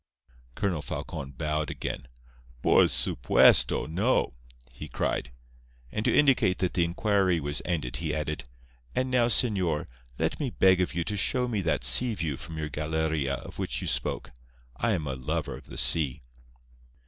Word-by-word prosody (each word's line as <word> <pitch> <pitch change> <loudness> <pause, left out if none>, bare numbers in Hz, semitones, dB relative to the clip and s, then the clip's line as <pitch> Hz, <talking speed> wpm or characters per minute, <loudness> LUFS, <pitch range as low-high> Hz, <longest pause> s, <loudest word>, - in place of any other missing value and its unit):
Colonel 95 -7 -1
Falcon 70 -1 -6
bowed 75 +2 -2
again. 65 - -5 0.6
"Por - - +6
supuesto, 60 - +4
no!" 95 - +1 0.4
he - - -8
cried. - - -2 0.6
And 105 - -2
to - - +3
indicate 130 -10 +4
that 90 - -1
the 85 - +2
inquiry 95 0 +1
was 70 -1 -3
ended 75 -9 -2
he 80 -2 -2
added: 75 -3 -3 0.5
"And 130 0 0
now, 120 -2 +3
señor, 95 -10 +2 0.3
let 80 +1 -1
me 145 -4 -1
beg 95 -4 +4
of 90 - -1
you 85 - 0
to 105 - -3
show 125 +5 +2
me 110 -5 -1
that 80 -3 0
sea 125 -3 +4
view 80 -6 -2
from 80 +4 -9
your 80 -1 -3
galeria 75 -2 -1
of - - -10
which - - -2
you - - -5
spoke. - - -1 0.4
I 115 - 0
am 85 -6 -2
a 70 - -3
lover 65 -1 -3
of - - -13
the - - -9
sea." 75 -3 +2
85 Hz, 165 wpm, -27 LUFS, 75-100 Hz, 0.6 s, Por